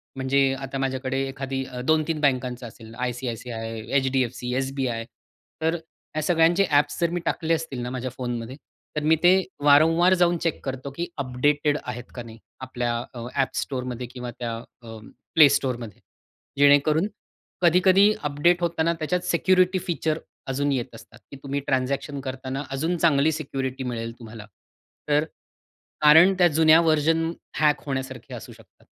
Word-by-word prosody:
म्हणजे 135 +1 +2
आता 135 0 -5
माझ्याकडे 135 0 -2
एखादी 135 0 -4 0.2
2-3 160 0 +1
बँकांचं 125 -3 0
असेल 110 0 -13
आयसीआयसीआय, 120 -2 -4 0.2
एचडीएफसी, 130 -2 -1
एसबीआय. 130 -3 -2 0.6
तर 160 +1 +1 0.4
या 155 - 0
सगळ्यांचे 170 +3 +3
ॲप्स 145 0 +2
जर 170 - +3
मी 175 - -1
टाकले 165 0 0
असतील 160 -5 -3
ना 120 - -4
माझ्या 130 0 -4
फोनमध्ये. 120 0 -5 0.4
तर 150 - -2
मी 160 +2 +4
ते 175 +1 +7 0.3
वारंवार 165 +5 +5
जाऊन 175 0 +2
चेक 165 -1 -3
करतो, 135 0 -5
की 170 +5 -4
अपडेटेड 145 +3 +1
आहेत 125 -1 -6
का 120 - -6
नाही 115 -1 -12 0.2
आपल्या 120 -2 -2 0.2
अ, 120 - -8 0.2
App - - -7
Storeमध्ये 125 -2 -5
किंवा 125 -1 -6
त्या 120 -2 -3 0.3
अ, - - -12 0.5
Play 155 -2 +10
Store 130 -3 -2
मध्ये 115 -5 -10 0.6
जेणेकरून, 145 +5 +4 0.5
कधी-कधी 185 +4 +5
अपडेट 150 +5 +2
होताना 170 -1 +1
त्याच्यात 175 +3 -1
सिक्युरिटी 185 +1 +2
फीचर 160 -2 -1 0.3
अजून 140 +2 0
येत 125 -4 -3
असतात, - - -15
की 140 - -9
तुम्ही 140 0 -2
ट्रान्झॅक्शन 135 +2 -1
करतांना 130 +1 -5
अजून 160 +6 -1
चांगली 155 -2 +3
सिक्युरिटी 135 -4 -4
मिळेल 115 -2 -4
तुम्हाला. 110 -2 -10 0.6
तर 150 +1 +3 0.8
कारण 160 +5 +7
त्या 175 - +7
जुन्या 160 0 +5
व्हर्जन 165 0 +2 0.3
हॅक 150 -1 +3
होण्यासारखे 130 -2 -5
असू - - -8
शकतात. - - -21
140 Hz, 145 wpm, -24 LUFS, 125-160 Hz, 0.8 s, Play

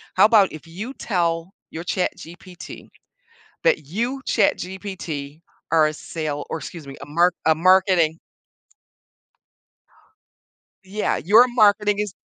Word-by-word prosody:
How 195 +2 +7
'bout 215 -4 +4
if 155 +1 -11
you 210 +11 -7
tell 170 -5 -2 0.2
your 165 - -6
ChatGPT 180 0 -6 0.8
that - - +2
'you, 240 - -3
ChatGPT, 175 -6 -2 0.3
are 155 -2 +4
a 155 - -3
sale' 150 -2 -5
or - - -3
excuse 155 +1 -9
me, 135 - -9
'a 140 - -7
mark 170 +4 +2
a 160 - +5
marketing'" 180 -2 +3 2.7
Yeah, 205 +3 -1
your 220 +8 +6
marketing 210 -3 +3
is, 210 -2 -2
180 Hz, 115 wpm, -22 LUFS, 160-205 Hz, 2.7 s, How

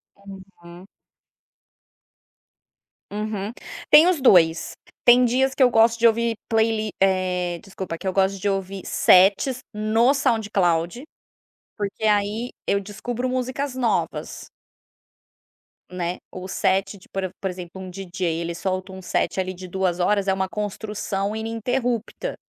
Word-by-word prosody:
Uhum. 190 -2 -13 2.2
Uhum, 210 0 -3 0.4
tem 310 +3 +8
os 360 -6 +1
2. 170 -9 +4 0.3
Tem 245 +1 +7
dias 265 +2 +1
que 270 - +4
eu 250 - +6
gosto 225 +1 +4
de 235 0 +5
ouvir 230 0 +1
playli 220 -1 +1
eh, 180 -2 +1
desculpa, 190 -4 -6
que 190 - -6
eu 190 - 0
gosto 195 0 +1
de 205 - -2
ouvir 195 -1 -3
sets 200 +8 +4
no 220 +5 +2
SoundCloud, 205 - 0 0.7
porque 205 +1 -4
aí 210 +3 +1 0.2
eu 200 - +3
descubro 240 +5 -4
músicas 255 +2 -2
novas. 250 -3 -2 1.4
Né, 180 -1 -3
o 185 0 -7
set 195 +1 0
de - - -20
por 190 -2 -4
por 190 - -1
exemplo, 180 0 -8
um 185 - -7
DJ 185 0 -7 0.2
ele 170 0 -3
solta 185 +2 -3
um 190 - -9
set 185 - -1
ali 185 0 -2
de 185 +1 -9
2h, 190 +2 0
é 190 - +3
uma 190 0 -1
construção 210 0 -3
ininterrupta. 235 - -2
200 Hz, 130 wpm, -23 LUFS, 185-230 Hz, 2.2 s, tem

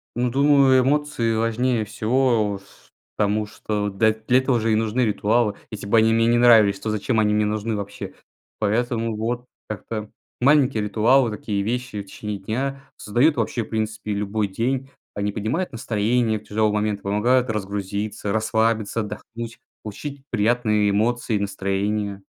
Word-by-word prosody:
Ну, 125 0 +1
думаю, 135 -1 +5
эмоции 135 -5 0
важнее 115 0 0
всего, 110 -1 +1
ф - - -22 0.3
потому 105 +1 +1
что, 105 -1 -3
да, 110 +3 +3
для 115 +4 +2
этого 130 -3 +1
же 110 0 0
и - - +4
нужны 110 +3 0
ритуалы: 105 +1 +1
если 105 -2 -7
бы 115 - +3
они 110 0 +4
мне 115 0 +3
не 120 0 +4
нравились, 110 -5 +6
то 110 - -4
зачем 110 +2 0
они 105 -1 +2
мне 105 0 +2
нужны 110 +1 -2
вообще. 100 0 -6 0.5
Поэтому, 115 +1 0
вот, 120 +3 -3 0.2
как-то 105 +1 -5 0.3
маленькие 135 -5 +4
ритуалы, 115 +4 +3
такие 105 -1 -3
вещи 120 -1 -3
в - - -10
течение 105 +1 -6
дня 135 +7 -4
создают 130 +9 +2
вообще, 115 - -1
в - - -13
принципе, 110 -1 -3
любой 105 +1 -1
день, 130 +6 -2 0.2
они 105 0 -2
поднимают 120 - -2
настроение 110 0 0
в - - -21
тяжелый 110 0 0
момент, 105 -1 -1
помогают 120 +5 +2
разгрузиться, 100 0 -3
расслабиться, 110 0 +1
отдохнуть, 115 +2 -7 0.2
получить 135 +6 -7
приятные 105 -2 +2
эмоции 110 +2 0
и - - -2
настроение. 100 0 -2
110 Hz, 155 wpm, -23 LUFS, 105-120 Hz, 0.5 s, нравились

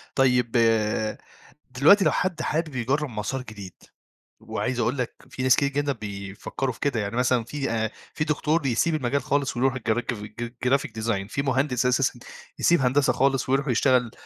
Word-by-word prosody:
طيب، 125 -3 +3 1.2
دلوقتي 160 +10 +5
لو 155 - +4
حد 180 -3 -1
حابب 155 -2 -2
يجرّب 135 +4 0
مَسار 115 +4 -3
جديد، 105 -6 -10 0.7
وعايز 125 -1 -3
أقول 120 +4 0
لك 125 -2 -2 0.2
في 130 - -5
ناس 130 -2 +6
كتير 140 - +1
جدًا 145 0 -1
بيفكّروا 105 +4 -5
في - - -17
كده، 140 -6 0
يعني 105 +2 -3
مثلًا 125 -2 +2
في 135 +1 -3
أ 110 -1 -1 0.2
في 150 - -1
دكتور 155 +1 0
بيسيب 140 +4 +1
المجال 140 0 0
خالص 140 -3 0
ويروح 130 +1 +2
الجركف 115 -2 -2
ج 110 +3 -6 0.2
graphic 135 +2 +2
design، 100 -4 -1
في 140 - -1
مهندس 130 -2 0
أساسًا 125 -1 +1 0.4
يسيب 170 -4 +4
هندسة 135 +2 +3
خالص 135 -1 +1
ويروح 140 +2 +1
يشتغل 125 -1 +2
130 Hz, 170 wpm, -25 LUFS, 115-140 Hz, 1.2 s, ناس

